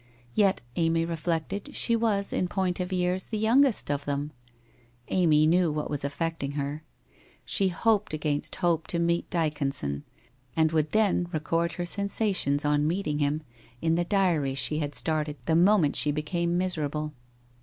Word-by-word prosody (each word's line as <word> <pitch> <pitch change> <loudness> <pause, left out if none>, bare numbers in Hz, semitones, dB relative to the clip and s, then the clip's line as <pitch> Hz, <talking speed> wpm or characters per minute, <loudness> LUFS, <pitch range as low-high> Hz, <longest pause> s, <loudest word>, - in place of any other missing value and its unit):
Yet, 195 - +2
Amy 165 0 +2
reflected, 170 - -3
she 235 - +4
was, 215 -3 +2
in 180 - 0
point 185 -1 -1
of 180 +1 -3
years, 180 0 0
the 220 - -3
youngest 230 - +3
of 145 0 -2
them! 145 +1 -2 0.8
Amy 155 -5 +3
knew 170 +1 +3
what 150 0 -3
was 145 -2 -2
affect 165 +3 -3
ing 140 0 -3
her. 145 +2 -4 0.6
She 195 - +2
hoped 210 +3 +1
against 150 -1 -2
hope 170 -3 0
to 170 - -1
meet 170 0 0
Dyconson, 140 - -1 0.5
and 160 -1 +3
would 155 -2 0
then 200 -5 +2
record 165 +2 -1
her 175 - -4
sensations 195 -6 +1
on 150 0 +2
meeting 160 -4 -1
him, 150 +1 0 0.4
in 160 +3 +1
the 175 +1 +1
diary 170 -8 +1
she 135 +4 +1
had 145 -2 -3
started 155 -2 -1
the 160 - +2
moment 175 -3 +4
she 150 - +3
became 170 +3 -1
miserable. 155 -4 -1
165 Hz, 160 wpm, -27 LUFS, 150-185 Hz, 0.8 s, she